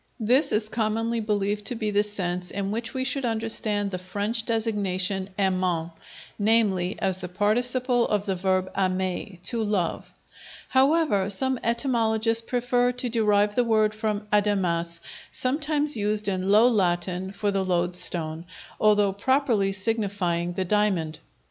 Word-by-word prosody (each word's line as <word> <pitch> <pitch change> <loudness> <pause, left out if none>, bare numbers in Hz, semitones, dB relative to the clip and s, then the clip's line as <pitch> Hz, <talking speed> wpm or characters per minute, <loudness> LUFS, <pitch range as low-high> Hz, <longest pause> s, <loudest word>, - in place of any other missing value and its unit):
This 255 +6 +3
is 215 0 +1
commonly 225 +1 -1
believed 210 -1 -1
to 245 - 0
be 215 -2 -2
the 205 0 +3
sense 180 -4 -3
in 200 0 -3
which 230 +1 -3
we 260 -1 -2
should 265 +1 -1
understand 220 -3 -1
the 185 - -4
French 205 +5 -2
designation 200 -4 -1
aimant, 185 -4 0 0.5
namely, 205 -4 +2
as 190 -2 0
the 180 -1 -6
participle 245 +5 +2
of 205 -1 -1
the 195 -2 -1
verb 185 0 0
aimer, 185 0 -1
"to 230 +2 +1
love"; 205 -5 -2 0.6
however, 265 - +3
some 260 +5 +1
etymologists 230 -2 +1
prefer 245 0 +1
to 250 0 -2
derive 210 -3 +2
the 245 - +2
word 215 -2 +2
from 215 -1 -2
adamas, 175 -5 0 0.3
sometimes 295 +2 0
used 210 -1 -1
in 190 -1 -1
Low 215 +4 +6
Latin 185 -3 0
for 200 +1 -1
the 195 -1 0
loadstone, 175 -2 -1 0.3
although 210 -2 +3
properly 225 -2 +1
signifying 195 -4 -1
the 185 +1 -2
diamond. 180 -6 0
210 Hz, 140 wpm, -25 LUFS, 185-230 Hz, 0.6 s, Low